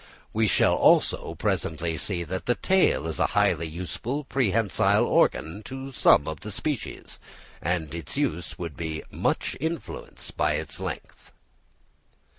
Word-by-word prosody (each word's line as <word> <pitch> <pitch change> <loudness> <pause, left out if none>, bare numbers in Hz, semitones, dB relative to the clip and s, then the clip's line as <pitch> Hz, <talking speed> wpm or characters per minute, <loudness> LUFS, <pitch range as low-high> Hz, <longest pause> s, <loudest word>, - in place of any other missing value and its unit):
We 110 0 +2
shall, - - +4
also, - - +3
presently 80 +1 -1
see 85 +1 -2
that 95 +3 -5
the 120 - +3
tail 190 - +3
is 80 -1 -2
a - - +4
highly 80 +1 +3
useful 90 - -4
prehensile 115 -7 +2
organ 80 +7 +2
to 135 +1 -6
some 75 - +5
of 80 - -4
the 105 - -7
species; 140 +6 -4 0.4
and 85 -2 -1
its 85 - -5
use 125 - -1
would 85 -5 -5
be 80 0 -4
much - - 0
influence 160 +2 -5
by - - +1
its - - -4
length. - - -7
90 Hz, 140 wpm, -26 LUFS, 80-130 Hz, 0.4 s, some